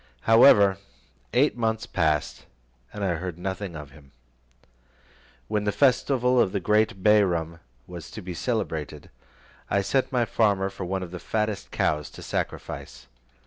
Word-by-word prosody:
However, 100 - +6 0.5
eight 140 +5 +3
months 110 -2 -1
passed, 80 -4 -1 0.4
and 105 - -6
I 90 -4 0
heard 90 -1 -5
nothing 95 0 -5
of 75 -3 -9
him. 70 -1 -18 1.3
When 105 -1 -1
the 105 - +1
festival 125 0 +2
of 95 - 0
the 100 - 0
great 105 -1 +1
Bairam 85 -6 +2 0.3
was 85 -4 -9
to 110 - -8
be 90 0 -6
celebrated, 80 - -4 0.6
I 100 0 +1
sent 130 +6 +1
to - - -20
my 120 -1 +2
farmer 100 -2 +1
for 95 -1 -6
one 95 +1 -2
of 85 - -8
the 90 - -7
fattest 105 0 -2
cows 75 -1 -1
to - - -9
sacrifice. - - -5
95 Hz, 150 wpm, -25 LUFS, 85-110 Hz, 1.3 s, However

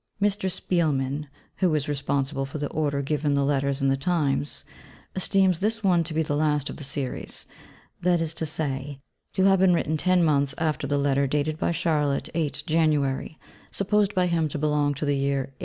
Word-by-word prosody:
Mr. 200 -2 +1
Spielmann 150 -6 0 0.3
(who 180 -5 +2
is 150 -1 -1
responsible 140 -1 -1
for 135 +3 -5
the 145 -1 -2
order 145 -2 -1
given 145 0 0
the 140 0 +2
Letters 140 -1 0
in - - +3
the 135 - +3
Times) 145 -2 -1 0.5
esteems 190 -2 +3
this 220 +2 0
one 180 -3 +3
to 155 0 -5
be 160 - +2
the 145 -1 -2
last 150 -1 +1
of - - -9
the 150 - -7
series; 135 -1 -3 0.6
that 175 -1 +3
is 165 -1 -2
to 160 0 -2
say, 140 -2 -3 0.3
to 190 - +1
have 195 -1 +5
been 185 -2 +5
written 155 -1 0
ten 185 +2 +3
months 140 -3 +2
after 155 -3 -1
the 145 +1 +1
Letter 140 0 +2
dated 150 +3 -1
by - - +1
Charlotte 150 -4 0
8 150 -3 -2
January, 155 -3 +1 0.3
supposed 205 0 +1
by 185 -1 +3
him 165 -3 +1
to 150 - -4
belong 150 -1 +1
to 145 - -3
the 145 -1 +1
year 135 -1 -1
1845. - - -37
150 Hz, 195 wpm, -25 LUFS, 140-170 Hz, 0.6 s, have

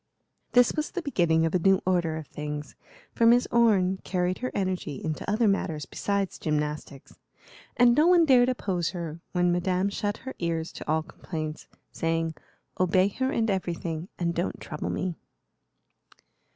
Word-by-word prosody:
This 245 -1 +5
was 305 0 -2
the 360 - -4
beginning 170 - +2
of 165 - -1
a 185 - +3
new 190 +2 +4
order 175 -3 +1
of 160 - -6
things, 150 0 -6 0.4
for 230 - +3
Miss 240 +1 +5
Orne 200 -6 +3
carried 180 0 -1
her 255 - -3
energy 185 -6 -2
into 155 +6 -4
other 220 +2 +2
matters 165 -6 0
besides 200 -2 -2
gymnastics, 150 -2 -3 0.6
and 245 -1 +6
no 305 +6 +4
one 350 -2 +6
dared 255 -3 +5
oppose 190 -9 -1
her 165 -1 -5
when 180 -1 +2
Madame 180 +2 +1
shut 205 +1 -2
her 265 - -5
ears 165 -1 -2
to - - -9
all 160 0 +1
complaints, 155 -1 -6 0.2
saying, 165 0 -1 0.5
"Obey 185 +1 +3
her 260 +6 -1
in 230 -4 +1
everything, 170 -2 -3
and 170 -1 -1
don't 175 +2 -2
trouble 150 - -5
me." 180 -3 -2
180 Hz, 160 wpm, -27 LUFS, 165-210 Hz, 0.6 s, and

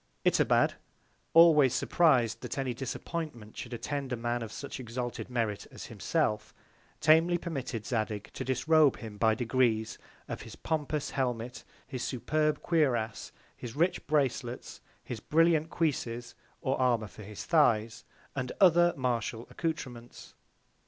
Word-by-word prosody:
Itobad, - - +4 0.6
always 150 -6 +7
surpriz'd, 125 -11 +3
that - - -5
any 135 -2 -1
Disappointment 130 -2 -5
should 120 - -7
attend 135 +3 -4
a - - +1
Man 120 +1 -2
of 110 -2 -6
such 140 +2 -7
exalted 120 0 -5
Merit 115 -5 -2
as - - -9
himself, 105 0 -1
very - - -33
tamely 165 +3 +5
permitted 135 -10 -4
Zadig 110 -3 -2
to - - -4
disrobe 150 +3 +3
him 110 -3 -9
by 110 -1 +4
Degrees 115 -2 +1 0.3
of - - -5
his - - -10
pompous 150 -2 -2
Helmet, 125 -2 -2 0.2
his 130 -4 -6
superb 150 +4 0
Cuirass, 125 -10 0 0.2
his 120 -2 -8
rich 170 +5 +1
Bracelets, 130 -5 -1 0.2
his 120 - -6
brilliant 160 +3 +3
Cuisses, 120 -8 -2 0.3
or 130 - 0
Armour 120 -3 +2
for 105 +1 -12
his 105 0 -8
Thighs, 115 -9 +2 0.3
and 130 -2 -3
other 175 -2 +5
Martial 120 -2 -1
Accoutrements. 130 -8 -5
125 Hz, 135 wpm, -30 LUFS, 115-155 Hz, 0.6 s, always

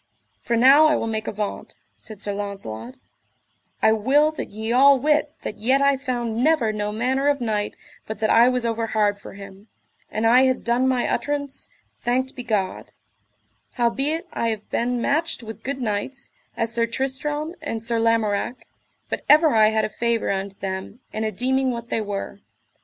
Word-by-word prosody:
For 235 - -1
now 275 +6 +7
I 305 - +3
will - - -1
make 220 -1 -3
avaunt, 210 0 -4 0.2
said 215 -2 -10
Sir 205 - -2
Launcelot, 200 - -6 0.9
I 220 - +6
will 275 +8 +3
that 310 - -6
ye 220 +2 -4
all 275 +3 +6
wit 300 +2 +1
that - - -5
yet 260 +5 +2
I 280 0 +4
found 245 -3 -2
never 275 -8 +2
no 210 0 -2
manner 255 +6 0
of 290 -1 +2
knight 215 -3 -2 0.3
but 220 - -5
that 215 +1 +1
I 235 +2 +6
was 250 -1 -1
overhard 220 -3 0
for - - -10
him, 200 +1 -12 0.4
an 220 +1 -2
I 250 +3 +6
had 260 -1 0
done 240 +2 +2
my 255 -2 +1
utterance, 285 -2 -3 0.3
thanked 255 +2 -1
be 250 - -5
God; 210 -6 -2 0.8
howbeit 270 +7 0
I 230 - -1
have 220 -2 -3
been 245 +1 0
matched 315 -2 0
with 220 0 -9
good 270 +2 -4
knights, 220 +5 -3 0.3
as 230 0 -1
Sir 230 0 +1
Tristram 280 +6 -3
and 225 -8 -4
Sir 230 0 0
Lamorak, 225 +1 0 0.4
but - - -4
ever 310 +2 +7
I 215 -1 +6
had 220 0 +1
a - - -3
favour 230 0 0
unto 195 0 -3
them 190 +4 -5
and 220 0 -2
a 215 - -1
deeming 260 +5 +1
what 235 -1 -5
they 225 - 0
were. 200 -1 -5
235 Hz, 180 wpm, -23 LUFS, 215-265 Hz, 0.9 s, now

